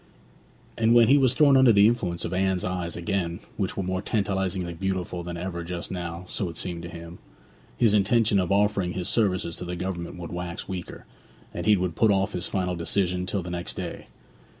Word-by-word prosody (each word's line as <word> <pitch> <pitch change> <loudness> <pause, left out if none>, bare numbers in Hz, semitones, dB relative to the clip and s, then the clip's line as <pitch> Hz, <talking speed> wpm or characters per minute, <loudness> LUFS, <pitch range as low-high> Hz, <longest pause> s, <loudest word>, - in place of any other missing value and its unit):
When 115 0 +6
he 140 +2 +6
was 130 -1 +3
thrown 145 -2 +6
under 130 -2 +7
the 100 -1 +6
influence 105 -7 0
of 85 - -4
Anne's 95 0 +1
eyes 90 -2 -3
again, 85 -1 -2 0.2
which 95 -3 -2
were 100 - -1
more 95 +1 -2
tantalizingly 95 -4 -1
beautiful 90 -1 -3
than 85 0 -6
ever 85 -1 -4
just 85 0 -5
now 85 -1 -5
(so 95 -1 -2
it 85 - -8
seemed 85 -2 -4
to 85 - -7
him), 85 0 -10 0.6
his 115 -4 +4
intention 105 0 +3
of 90 -1 -1
offering 100 -3 +2
his 90 -1 -3
services 95 -7 +1
to 90 - -5
the 90 0 -4
Government 90 -1 -4
would 85 -1 -7
wax 90 -1 -5
weaker, 95 -2 -7 0.5
and - - -4
he 105 -1 +6
would 90 -2 -2
put 110 - +4
off 95 -1 +2
his 90 -1 -1
final 90 -2 -1
decision 90 +1 0
till 95 0 -1
the 90 - -6
next 85 0 -3
day. - - -6
90 Hz, 200 wpm, -26 LUFS, 85-100 Hz, 0.6 s, under